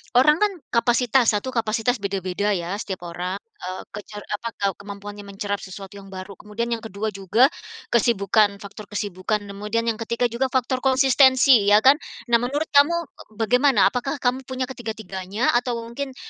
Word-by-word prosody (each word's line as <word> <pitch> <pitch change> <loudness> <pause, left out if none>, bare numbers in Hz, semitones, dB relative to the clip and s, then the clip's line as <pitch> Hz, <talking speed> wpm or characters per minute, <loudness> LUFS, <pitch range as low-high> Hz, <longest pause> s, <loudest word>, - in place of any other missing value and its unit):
orang 300 +5 +5
kan 420 -1 +3 0.2
kapasitas 240 -1 +3
satu 260 +6 -2
kapasitas 230 0 0
beda-beda 195 +1 -1
ya, 180 +4 -3
setiap 190 -5 -5
orang, 180 +2 -3
eee, 185 -3 -8
kece 210 +1 -9
apa, 230 +3 -4
ke 200 - 0
kemampuannya 205 0 -9
mencerap 200 +1 -3
sesuatu 195 +1 -9
yang 195 - -13
baru, 190 +1 -8
kemudian 235 +3 -4
yang 230 - 0
ke-2 220 -1 -4
juga 210 - +3 0.4
kesibukan, 210 -3 +3
faktor 200 0 -11
kesibukan, 205 +1 -2
kemudian 210 +3 -2
yang 230 -1 -1
ke-3 235 +1 -1
juga 260 +3 0
faktor 255 0 0
konsistensi 260 -3 +5
ya, 210 +1 +6
kan. 275 +4 +6 0.3
Nah, 235 - +6
menurut 285 +6 -2
kamu, 290 +4 +5
eee, 220 -7 -17
bagaimana, 250 +1 +3
apakah 265 +4 -2
kamu 255 0 -1
punya 260 0 -3
ketiga-tiganya, 220 -4 -3
atau 245 -1 -3
mungkin, 260 +3 -6
220 Hz, 160 wpm, -23 LUFS, 200-250 Hz, 0.4 s, ya